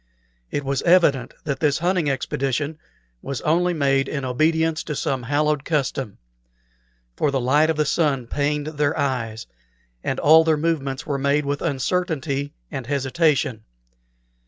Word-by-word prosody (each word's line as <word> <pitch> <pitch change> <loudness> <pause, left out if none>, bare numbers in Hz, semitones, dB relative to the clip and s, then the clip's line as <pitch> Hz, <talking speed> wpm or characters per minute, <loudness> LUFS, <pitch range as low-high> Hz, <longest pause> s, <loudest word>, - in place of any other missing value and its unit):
It 145 - -3
was 135 -1 -1
evident 165 -8 +3
that 140 -2 -3
this 150 -3 +2
hunting 175 -3 +1
expedition 140 +2 -2 0.4
was 135 -4 -4
only 175 +3 +2
made 135 -4 +1
in 140 -3 -3
obedience 160 +5 +1
to 150 - -4
some 135 -1 -1
hallowed 145 +3 0
custom; 135 -8 -2 1.0
for 150 - +1
the 140 -1 0
light 145 +5 +3
of 160 - 0
the 150 - +2
sun 140 -5 +1
pained 145 +3 -1
their 150 -1 -1
eyes, 115 -5 -2 0.6
and - - -2
all 160 +2 +7
their 160 -1 +2
movements 150 -4 -2
were 140 -2 -2
made 140 +2 +1
with 140 0 -2
uncertainty 145 -1 -1 0.2
and 135 -5 -5
hesitation. 135 -4 +1
145 Hz, 145 wpm, -22 LUFS, 135-155 Hz, 1.0 s, all